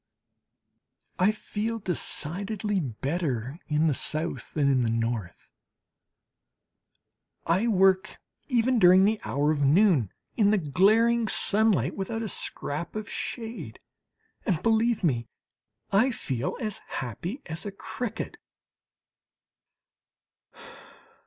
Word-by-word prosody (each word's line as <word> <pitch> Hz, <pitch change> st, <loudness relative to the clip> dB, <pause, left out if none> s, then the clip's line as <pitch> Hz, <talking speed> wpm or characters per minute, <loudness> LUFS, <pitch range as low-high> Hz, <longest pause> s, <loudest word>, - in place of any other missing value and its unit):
I 185 Hz, +3 st, +4 dB
feel 215 Hz, +1 st, -4 dB
decidedly 195 Hz, +2 st, -2 dB
better 135 Hz, 0 st, -3 dB
in 150 Hz, +1 st, +1 dB
the 155 Hz, -, +3 dB
South 155 Hz, +5 st, -3 dB
than 145 Hz, -3 st, +2 dB
in 135 Hz, -2 st, +3 dB
the 115 Hz, -, +1 dB
North. 115 Hz, -5 st, -3 dB, 1.9 s
I 185 Hz, +8 st, +2 dB
work 195 Hz, -1 st, +3 dB, 0.3 s
even 245 Hz, -1 st, +2 dB
during 185 Hz, 0 st, +7 dB
the 215 Hz, +1 st, +1 dB
hour 140 Hz, +7 st, +1 dB
of 150 Hz, -2 st, -1 dB
noon, 145 Hz, -, +4 dB, 0.2 s
in 210 Hz, -3 st, +4 dB
the 215 Hz, -, +4 dB
glaring 215 Hz, -, +3 dB
sunlight, 200 Hz, -, +3 dB
without 225 Hz, +4 st, -3 dB
a 215 Hz, -, -3 dB
scrap 155 Hz, +1 st, -3 dB
of 215 Hz, -1 st, -4 dB
shade; 230 Hz, -1 st, -6 dB, 0.6 s
and, 185 Hz, -5 st, -1 dB
believe 225 Hz, -1 st, +2 dB
me, 120 Hz, -8 st, +1 dB, 0.6 s
I 220 Hz, +7 st, +4 dB
feel 130 Hz, -, -3 dB
as 215 Hz, -5 st, -3 dB
happy 170 Hz, -, -5 dB
as 160 Hz, +4 st, -3 dB
a -, -, -4 dB
cricket. 220 Hz, +3 st, -5 dB
190 Hz, 105 wpm, -27 LUFS, 145-220 Hz, 1.9 s, during